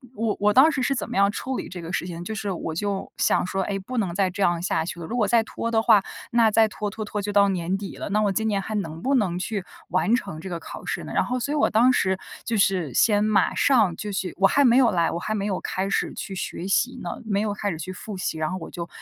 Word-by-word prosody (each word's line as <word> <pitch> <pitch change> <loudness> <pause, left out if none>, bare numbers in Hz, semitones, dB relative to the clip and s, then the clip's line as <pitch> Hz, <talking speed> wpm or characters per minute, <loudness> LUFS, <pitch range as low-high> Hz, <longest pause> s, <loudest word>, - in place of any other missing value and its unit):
我 220 -1 -1
我 205 0 +3
当 290 +5 +7
时 265 - -2
是 275 +2 +1
怎 235 - -4
么 235 - -3
样 200 0 +5
处 260 +4 -3
理 - - -5
这 180 -2 -8
个 165 +1 -7
事 175 - -1
情， 170 0 -6
就 220 - -5
是 210 -2 -3
我 165 -2 -4
就 200 +3 -3
想 - - +2
说， 190 +1 -1
诶， 195 0 -2
不 250 +6 -6
能 185 -6 -1
再 190 -2 +2
这 185 +3 -6
样 175 -2 +2
下 160 -3 0
去 175 - -5
了， - - -5
如 240 +8 -4
果 210 -4 +2
再 230 0 +4
拖 230 +1 -4
的 225 -1 +2
话， 220 -3 +6 0.3
那 230 -2 +5
再 220 0 +4
拖 210 0 -4
拖 215 +1 -6
拖 210 0 -4
就 205 0 -3
到 200 -1 +5
年 185 0 -1
底 195 -1 -7
了， - - -5
那 210 +1 +2
我 205 -2 +2
今 220 +3 -1
年 200 -2 0
还 215 +3 -5
能 165 -4 -4
不 275 +1 +1
能 185 -7 +1
去 195 -1 -3 0.2
完 185 +6 +2
成 155 -10 -4
这 190 - -7
个 170 - -3
考 - - -9
试 - - -3
呢？ - - -8
然 - - +3
后 250 +1 -2
所 285 +5 -3
以 - - 0
我 290 - +3
当 240 +4 +5
时 190 -5 +1 0.3
就 230 - -1
是 185 -8 +1
先 210 -2 +4
马 205 -3 +2
上 220 -11 +3
就 210 -1 -5
去 190 -3 -3
我 195 - +4
还 285 +7 +3
没 245 0 +5
有 250 -3 +5
来， 170 -3 +2
我 170 - -3
还 215 - -3
没 200 -1 -2
有 190 - -1
开 190 +1 -2
始 - - 0
去 195 - -6
学 180 0 -4
习 255 +6 +1
呢， - - -4 0.2
没 200 -1 0
有 210 -1 -1
开 205 0 -2
始 160 - -5
去 185 +4 -5
复 200 +2 -7
习， 180 -3 -3
然 155 -1 -1
后 185 - -3
我 165 - -8
就 170 -1 -6
200 Hz, 320 characters per minute, -24 LUFS, 180-220 Hz, 0.3 s, 当